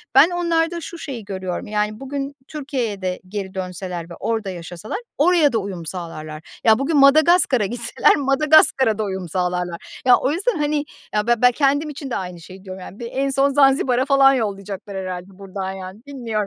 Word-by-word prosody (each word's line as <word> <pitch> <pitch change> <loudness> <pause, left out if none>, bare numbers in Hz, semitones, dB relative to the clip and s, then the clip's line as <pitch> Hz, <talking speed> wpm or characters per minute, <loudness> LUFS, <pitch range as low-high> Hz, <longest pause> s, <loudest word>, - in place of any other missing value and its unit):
ben - - +8
onlarda 340 -1 0
şu 340 - -8
şeyi 255 -9 -7
görüyorum. 190 -2 -4
Yani 210 0 -1
bugün 275 +1 -5
Türkiye'ye 260 -9 -3
de 185 -1 -2
geri 195 0 -5
dönseler 180 -2 -5
ve - - -8
orada 225 -3 -2
yaşasalar 175 - -6 0.2
oraya 310 -4 +4
da - - +2
uyum 190 -4 -6
sağlarlar. 155 -3 -6 0.2
Ya 220 +1 +5
bugün 295 +3 +1
Madagaskar'a 280 - +5
gitseler 235 +3 +2
Madagaskar'a 275 -4 +4
da 220 - -1
uyum 190 -3 -4
sağlarlar. 180 -1 -3
Ya 250 -1 +8
o 265 - 0
yüzden, 385 +5 0
hani, 295 0 0 0.3
ya 210 +1 0
be 240 - +5
ben 250 +2 +5
kendim 285 +3 +1
için 285 -2 -7
de - - -2
aynı 180 -2 -5
şeyi 185 +3 -12
diyorum 185 -1 -8
yani. 195 - -10
Bir 235 -1 -5
en 275 +1 0
son 275 +1 +2
Zanzibar'a 270 -2 +3
falan 275 -1 +5
yollayacaklar 200 -3 -4
herhâlde 185 0 -5
buradan 190 -1 -5
yani. 190 +2 -9
Bilmiyorum. 260 -5 -7
225 Hz, 180 wpm, -21 LUFS, 190-275 Hz, 0.3 s, ben